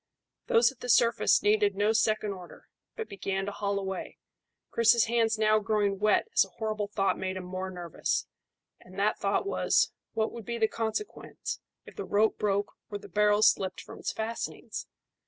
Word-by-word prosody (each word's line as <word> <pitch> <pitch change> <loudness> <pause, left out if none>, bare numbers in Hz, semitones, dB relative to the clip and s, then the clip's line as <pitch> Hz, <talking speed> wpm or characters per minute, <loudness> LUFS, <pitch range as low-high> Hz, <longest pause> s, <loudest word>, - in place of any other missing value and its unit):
Those 230 +1 +5
at 265 - -20
the 250 - -6
surface 235 0 +4
needed 205 -1 +3
no 205 +2 +2
second 215 -2 +1
order, 180 -2 -12 0.3
but 450 - -5
began 195 -1 -3
to 205 - -3
haul 200 0 -2
away, 190 -1 -4 0.5
Chris's 230 0 +5
hands 225 -1 +1
now 215 0 +4
growing 205 -2 0
wet 210 - +3
as - - +6
a - - -9
horrible 215 -2 -2
thought 195 -2 0
made 190 0 -3
him 185 - -5
more 185 +1 -4
nervous; 175 -3 -2 0.5
and 185 +1 -15
that 205 +2 +1
thought 200 - 0
was, 400 - +2 0.2
What 220 0 0
would 235 - -8
be 235 +2 -4
the 220 -1 +3
consequence 225 - -4 0.3
if - - -13
the 410 - -4
rope 215 - +2
broke 205 0 0 0.2
or 205 - -4
the - - -13
barrel 210 0 +3
slipped 195 -3 +3
from - - -11
its - - -2
fastenings? 225 +1 -5
210 Hz, 180 wpm, -29 LUFS, 195-225 Hz, 0.5 s, as